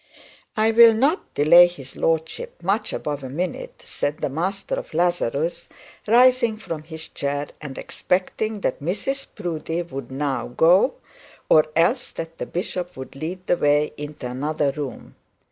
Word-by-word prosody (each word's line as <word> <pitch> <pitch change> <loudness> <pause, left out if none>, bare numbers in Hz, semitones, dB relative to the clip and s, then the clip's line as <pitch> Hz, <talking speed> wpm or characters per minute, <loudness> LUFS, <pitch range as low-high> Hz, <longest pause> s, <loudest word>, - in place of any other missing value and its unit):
'I 220 +1 +4
will 230 0 +8
not 280 - +1
delay 170 +4 +8
his 140 -7 -10
lordship 160 +1 -2
much 200 +5 0
above 145 -2 -4
a 130 - -5
minute,' 170 +5 -4
said 145 +1 -2
the - - -2
master 190 +7 -2
of - - -4
Lazarus, 170 -2 0 0.4
rising 240 0 +5
from 165 -7 -6
his 160 0 -9
chair, 145 +1 -3
and 140 -3 -7
expecting 205 +3 -2
that 130 - -1
Mrs 210 - -2
Proudie 170 -3 -3
would 135 -6 -7
now 135 0 -2
go, 170 - +4 0.5
or 155 -1 +6
else 170 +11 +2
that 165 0 -7
the - - -4
bishop 180 -1 -4
would 130 0 -8
lead 175 +6 -5
the 175 - +2
way 145 0 +2
into 145 -2 -7
another 145 +3 -1
room. 140 -1 -7
165 Hz, 150 wpm, -23 LUFS, 145-190 Hz, 0.5 s, will